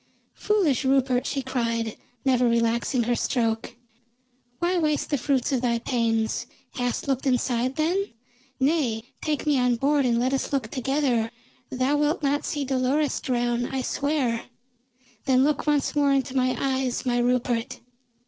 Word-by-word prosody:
"Foolish 365 - +1
Rupert!" 265 -2 +2
she 275 -2 -2
cried, 230 -3 -2 0.3
never 250 -2 +3
relaxing 235 +2 +1
her 240 +2 +1
stroke. 225 -3 -1 0.8
"Why 350 +3 +1
waste 305 -2 0
the 290 - +2
fruits 265 +1 0
of 260 -3 +1
thy 235 -2 +1
pains? 230 -2 -1 0.3
Hast 245 0 -2
looked 270 0 0
inside 250 0 +1
then? 355 +6 0 0.5
Nay, 265 -6 +1 0.2
take 305 -1 -2
me 290 -3 +3
on 250 -1 +2
board, 280 +2 +2
and 235 -1 +2
let 255 +2 +1
us 270 - -1
look 265 -6 -1
together. 260 -3 0 0.4
Thou 260 +3 +1
wilt 295 +2 0
not 285 +1 +1
see 290 -2 -2
Dolores 265 +3 0
drown, 240 -1 0
I 265 -1 -3
swear. 280 -6 -1 0.8
Then 260 -1 +4
look 300 +1 0
once 295 -1 +1
more 285 -1 +3
into 270 -1 0
my 255 -1 +1
eyes, 265 -2 -1
my 245 -1 +1
Rupert!" 240 -1 0
260 Hz, 150 wpm, -25 LUFS, 240-285 Hz, 0.8 s, Then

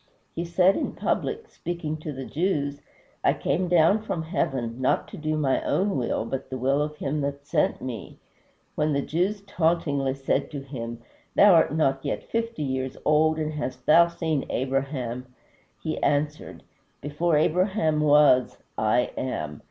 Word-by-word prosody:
He 170 - -2
said 180 +3 +4
in - - -2
public, 455 -1 -2
speaking 170 - -4
to 155 0 -6
the 135 -2 -6
Jews, 145 -4 -1 0.4
"I - - +4
came 180 +6 0
down 175 +5 +4
from 180 -6 -3
heaven, 130 -7 -2
not 130 - +1
to - - -9
do 155 -1 -1
my 140 -3 +1
own 200 +1 +1
will, 120 -3 -1
but 135 +2 -5
the 130 - -4
will 135 +3 +1
of 150 0 -2
him 150 0 -2
that 140 0 -4
sent - - 0
me." 120 -6 -6 0.6
When 150 0 0
the 140 0 0
Jews 190 +6 -1
tauntingly 160 -8 0
said 135 0 -1
to 145 -3 -6
him, 120 -4 -7 0.3
"Thou 205 -1 +7
art 160 -2 +4
not 135 -4 +1
yet - - -2
fifty 230 -6 -3
years 130 -1 -3
old, 155 +1 +3
and 155 -1 -2
hast 130 -4 -5
thou 170 +2 +7
seen 160 -4 -2
Abraham?" 130 -1 -2 0.6
he 155 - -3
answered, 150 +1 -1 0.4
"Before 150 +3 +1
Abraham 160 0 +2
was, 145 -4 +5 0.2
I 110 +3 +2
AM." 75 - -4
150 Hz, 160 wpm, -25 LUFS, 135-165 Hz, 0.6 s, Thou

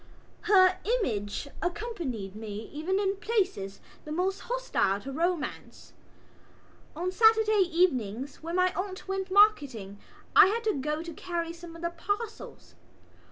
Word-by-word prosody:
Her 375 -2 +6 0.2
image 205 - -2
accompanied 345 - -4
me 215 0 -7
even 325 +6 -1
in 395 -1 0
places 390 - -1 0.2
the 300 - -8
most 370 +4 0
hostile 485 - 0
to 275 - -7
romance. 330 +1 -3 1.0
On 355 +3 -2
Saturday 435 -1 +4
evenings 270 - 0
when 335 +2 -4
my 365 0 +3
aunt 375 0 -5
went 385 0 -3
marketing 285 - +3 0.4
I - - +9
had 455 +4 -1
to 435 -2 +1
go 300 +2 -2
to 335 -1 -7
carry 335 0 -4
some 335 0 -11
of 335 - -11
the 340 - -1
parcels. 410 +6 -5
350 Hz, 135 wpm, -28 LUFS, 275-395 Hz, 1.0 s, I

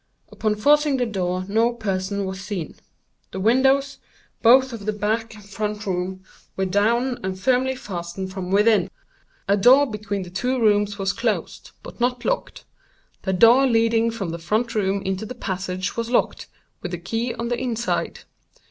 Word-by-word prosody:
Upon 215 -1 -1
forcing 290 +5 +3
the 250 - +1
door 185 -4 -2
no 225 +4 +2
person 200 -3 -2
was 190 0 -5
seen. 195 -5 -5 0.6
The 190 - -6
windows, 265 +6 +2 0.4
both 260 +2 +5
of 215 -3 -8
the 215 - +1
back 220 +2 -2
and 210 -2 -14
front 210 +1 -4
room, 185 0 -3 0.3
were 190 - 0
down 235 +6 +1
and 185 0 -3
firmly 260 +3 +1
fastened 185 -3 -6
from 185 -2 -5
within. 205 -1 +3 0.6
A 200 - +4
door 255 +8 +6
between 210 -4 -4
the 175 - -11
two 250 +7 -1
rooms 205 -2 +2
was 195 -1 -1
closed, - - -3
but - - -11
not 245 0 0
locked. - - -2 0.6
The 190 - -1
door 235 +8 +6
leading 230 -1 +2
from 220 -6 -4
the 170 - -5
front 215 +8 -1
room 200 -2 0
into 190 +3 -3
the 250 - -7
passage 185 -3 -4
was 230 0 -3
locked, 245 - 0 0.3
with 180 - -4
the - - -2
key 225 +7 -3
on 235 0 -4
the 245 - -1
inside. 235 -2 -2
210 Hz, 170 wpm, -23 LUFS, 190-240 Hz, 0.6 s, door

